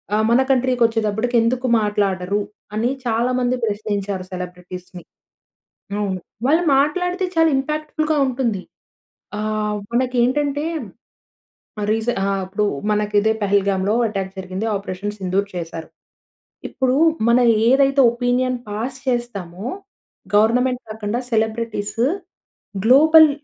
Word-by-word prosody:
ఆ! -, -, +2 dB
మన 240 Hz, +3 st, +5 dB
కంట్రీకి 255 Hz, -2 st, +2 dB
వచ్చేటప్పటికి 225 Hz, +1 st, 0 dB
ఎందుకు 250 Hz, +3 st, 0 dB
మాట్లాడరు? 200 Hz, -2 st, 0 dB, 0.4 s
అని 225 Hz, +3 st, +1 dB, 0.2 s
చాలా 235 Hz, +2 st, +1 dB
మంది 250 Hz, 0 st, +1 dB
ప్రశ్నించారు 205 Hz, -3 st, -2 dB
సెలబ్రిటీస్‌ని. 180 Hz, 0 st, -8 dB, 0.9 s
అవును. 195 Hz, -3 st, -2 dB, 0.3 s
వాళ్ళు 320 Hz, +5 st, +3 dB
మాట్లాడితే 360 Hz, +6 st, +1 dB
చాలా 325 Hz, 0 st, +4 dB
ఇంపాక్ట్ 305 Hz, +3 st, -3 dB
ఫుల్‌గా 310 Hz, -1 st, +1 dB
ఉంటుంది. 240 Hz, -7 st, -1 dB, 0.8 s
ఆహ్, 215 Hz, 0 st, -1 dB, 0.2 s
మనకి 255 Hz, +1 st, 0 dB
ఏంటంటే 290 Hz, +3 st, 0 dB, 1.3 s
రీసె 225 Hz, +2 st, 0 dB
ఆహ్, 195 Hz, 0 st, 0 dB
అపుడు 200 Hz, +3 st, -1 dB, 0.3 s
మనకు 210 Hz, 0 st, 0 dB
ఇదే 220 Hz, +1 st, +2 dB
పహల్గామ్‌లో 200 Hz, 0 st, +1 dB
అటాక్ 195 Hz, -3 st, -4 dB
జరిగింది 190 Hz, +4 st, -4 dB
'ఆపరేషన్ 200 Hz, +1 st, -4 dB
సింధూర్' 195 Hz, +2 st, -1 dB
చేసారు. 165 Hz, -1 st, -6 dB, 0.8 s
ఇప్పుడు 260 Hz, -1 st, 0 dB, 0.3 s
మన 235 Hz, +1 st, +5 dB, 0.3 s
ఏదైతే 275 Hz, +1 st, +4 dB
ఒపీనియన్ 250 Hz, +1 st, 0 dB
పాస్ 230 Hz, +6 st, -4 dB
చేస్తామో 210 Hz, -7 st, -3 dB, 0.7 s
గవర్నమెంట్ 250 Hz, +4 st, +3 dB
కాకుండా 220 Hz, +2 st, -3 dB
సెలబ్రిటీసు 220 Hz, 0 st, -1 dB, 0.8 s
గ్లోబల్ 310 Hz, +5 st, +7 dB
225 Hz, 110 wpm, -20 LUFS, 200-255 Hz, 1.3 s, గ్లోబల్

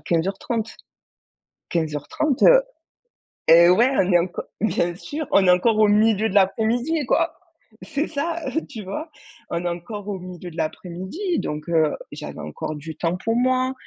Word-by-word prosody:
15:30. 195 Hz, +6 st, -1 dB, 1.0 s
15h30, 165 Hz, -, -1 dB
heu -, -, +8 dB, 0.9 s
et 170 Hz, +1 st, +8 dB
ouais, 235 Hz, +8 st, +5 dB
on 185 Hz, -, +2 dB
est 175 Hz, -, +6 dB
enco 175 Hz, +2 st, -3 dB, 0.2 s
bien 175 Hz, -4 st, 0 dB
sûr, 300 Hz, -, -5 dB
on 195 Hz, -1 st, +4 dB
est 180 Hz, -, +7 dB
encore 215 Hz, +5 st, +3 dB
au 215 Hz, -, +6 dB
milieu 215 Hz, +1 st, +3 dB
de -, -, -6 dB
l'après-midi 235 Hz, +10 st, +2 dB
quoi. 330 Hz, +6 st, +1 dB, 0.5 s
C'est 310 Hz, 0 st, -2 dB
ça, 325 Hz, +2 st, -3 dB, 0.3 s
tu 220 Hz, -, -7 dB
vois? 305 Hz, -, -5 dB, 0.4 s
On 170 Hz, 0 st, -2 dB
est -, -, +1 dB
encore 190 Hz, +4 st, -6 dB
au 195 Hz, -, -3 dB
milieu 180 Hz, -1 st, -9 dB
de 165 Hz, -, -14 dB
l'après-midi, 185 Hz, -, -3 dB
donc 150 Hz, +2 st, -5 dB
heu, 160 Hz, -3 st, +2 dB, 0.2 s
j'avais -, -, -8 dB
encore 75 Hz, -, -5 dB
du 155 Hz, +2 st, -8 dB
temps 170 Hz, +1 st, 0 dB
pour 225 Hz, +4 st, -1 dB
moi. 255 Hz, +1 st, +2 dB
200 Hz, 160 wpm, -23 LUFS, 170-255 Hz, 1.0 s, heu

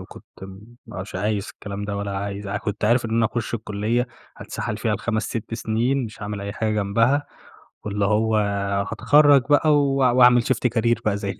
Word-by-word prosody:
وكنت -, -, -12 dB, 0.2 s
م 100 Hz, +5 st, -12 dB
مش 95 Hz, +2 st, -8 dB
عايز 105 Hz, +1 st, -2 dB
الكلام 100 Hz, 0 st, -6 dB
ده 100 Hz, -1 st, -4 dB
ولا 100 Hz, -1 st, -3 dB
عايز 100 Hz, +1 st, -5 dB
ع 100 Hz, -, -3 dB
كنت 105 Hz, 0 st, -4 dB
عارف 120 Hz, +2 st, +3 dB
إن 110 Hz, -, -4 dB
أنا 115 Hz, 0 st, +2 dB
هاخش 120 Hz, 0 st, -4 dB
الكلية 110 Hz, +3 st, -1 dB, 0.3 s
هاتسَحَل 105 Hz, -, -5 dB
فيها 110 Hz, -1 st, -1 dB
ب5 110 Hz, +1 st, -2 dB
6 115 Hz, 0 st, -5 dB
سنين 120 Hz, +4 st, 0 dB
مش 110 Hz, 0 st, -10 dB
هاعمل 105 Hz, 0 st, -4 dB
أي 100 Hz, 0 st, -5 dB
حاجة 110 Hz, 0 st, -2 dB
جنبها، 115 Hz, +8 st, +1 dB, 0.6 s
واللي 105 Hz, -1 st, -1 dB
هو 110 Hz, +2 st, +2 dB, 0.6 s
هاتخرّج 145 Hz, -2 st, +5 dB
بقى 150 Hz, +1 st, +4 dB
و 140 Hz, -1 st, +2 dB
واعمل 125 Hz, -2 st, +5 dB
شيفت 125 Hz, -1 st, +1 dB
كارير 120 Hz, 0 st, +1 dB
بقى 105 Hz, -2 st, +1 dB
زي 100 Hz, -1 st, -5 dB
110 Hz, 185 wpm, -22 LUFS, 100-120 Hz, 0.6 s, هاتخرّج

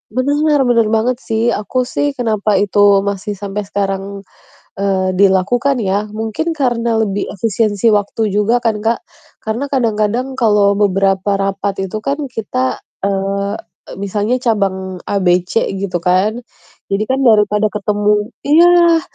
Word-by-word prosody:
Bener 290 Hz, +2 st, +2 dB
bener 230 Hz, -3 st, +2 dB
banget 230 Hz, +3 st, 0 dB
sih, 225 Hz, 0 st, 0 dB
aku 250 Hz, +5 st, -1 dB
sih 285 Hz, +3 st, -2 dB
kenapa 215 Hz, -4 st, 0 dB
itu 205 Hz, +1 st, +1 dB, 0.2 s
masih 200 Hz, +1 st, -3 dB
sampai 200 Hz, 0 st, -5 dB
sekarang, 195 Hz, 0 st, -3 dB, 0.5 s
eee, 190 Hz, -2 st, 0 dB
dilakukan 215 Hz, +7 st, +2 dB
ya? 200 Hz, +1 st, 0 dB
Mungkin, 225 Hz, +10 st, -2 dB
karena 235 Hz, -5 st, 0 dB
lebih 200 Hz, -2 st, -1 dB
efisiensi 215 Hz, +1 st, +1 dB
waktu 210 Hz, +1 st, 0 dB
juga 210 Hz, +4 st, +1 dB
kan, 225 Hz, -2 st, 0 dB
Kak. 230 Hz, +1 st, +1 dB, 0.4 s
Karena 225 Hz, +6 st, -3 dB
kadang-kadang 245 Hz, 0 st, -1 dB
kalau 205 Hz, -4 st, +3 dB
beberapa 195 Hz, 0 st, +1 dB
rapat 195 Hz, 0 st, -1 dB, 0.2 s
itu 215 Hz, -, -4 dB
kan 285 Hz, +2 st, -1 dB
kita, 130 Hz, -, -2 dB, 0.2 s
eee, 200 Hz, +1 st, -1 dB, 0.4 s
misalnya 205 Hz, +5 st, -1 dB
cabang 190 Hz, -6 st, -2 dB
A, 200 Hz, -, 0 dB
B, 180 Hz, -1 st, +3 dB
C, 180 Hz, +5 st, -1 dB
gitu 190 Hz, -2 st, -2 dB
kan. 185 Hz, +6 st, +1 dB, 0.5 s
Jadi 200 Hz, +1 st, -1 dB
kan 265 Hz, -, +1 dB
daripada 210 Hz, -2 st, +3 dB
ketemu 210 Hz, +1 st, 0 dB, 0.2 s
iya, 340 Hz, +2 st, +5 dB
210 Hz, 135 wpm, -16 LUFS, 195-235 Hz, 0.5 s, iya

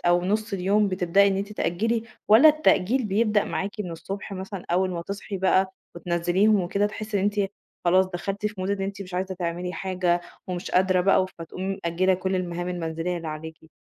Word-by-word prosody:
أو 175 Hz, 0 st, +3 dB
نُص 215 Hz, +2 st, -1 dB
اليوم 200 Hz, +2 st, +2 dB
بتبدئي 185 Hz, +1 st, +3 dB
إن 195 Hz, -, 0 dB
أنتِ 200 Hz, +2 st, -3 dB
تأجلي 225 Hz, +5 st, 0 dB, 0.3 s
والّا 230 Hz, +9 st, +8 dB
التأجيل 265 Hz, -5 st, +3 dB
بيبدأ 210 Hz, 0 st, +2 dB
معاكِ 195 Hz, -, -2 dB
من 180 Hz, -4 st, -4 dB
الصبح 195 Hz, +5 st, -6 dB
مثلًا 190 Hz, 0 st, -6 dB
أول 185 Hz, +2 st, +2 dB
ما 170 Hz, -1 st, -4 dB
تصحي 200 Hz, +2 st, -5 dB
بقى 190 Hz, 0 st, +2 dB, 0.2 s
وتنزليهم 175 Hz, +5 st, +2 dB
وكده، 200 Hz, +3 st, +1 dB
تحسّي 215 Hz, 0 st, -3 dB
إن -, -, 0 dB
أنتِ 205 Hz, -1 st, +1 dB, 0.4 s
خلاص 185 Hz, +2 st, +4 dB
دخلتِ 195 Hz, +3 st, -3 dB
في 210 Hz, -, -4 dB
Mood 185 Hz, +1 st, -1 dB
إن 200 Hz, -1 st, -1 dB
أنتِ 200 Hz, +1 st, -4 dB
مش 180 Hz, -1 st, -10 dB
عايزه 185 Hz, +1 st, -2 dB
تعملي 175 Hz, 0 st, -3 dB
حاجة 180 Hz, -2 st, 0 dB, 0.3 s
ومش 180 Hz, -1 st, -4 dB
قادرة 185 Hz, 0 st, +3 dB
بقى، 190 Hz, 0 st, +3 dB
فتقومي 190 Hz, +4 st, -4 dB
مأجلة 185 Hz, +3 st, +2 dB
كل 190 Hz, +1 st, -1 dB
المهام 175 Hz, 0 st, -3 dB
المنزلية 170 Hz, 0 st, -3 dB
اللي 165 Hz, -1 st, -5 dB
عليكِ؟ 160 Hz, +1 st, -8 dB
190 Hz, 185 wpm, -25 LUFS, 175-200 Hz, 0.4 s, والّا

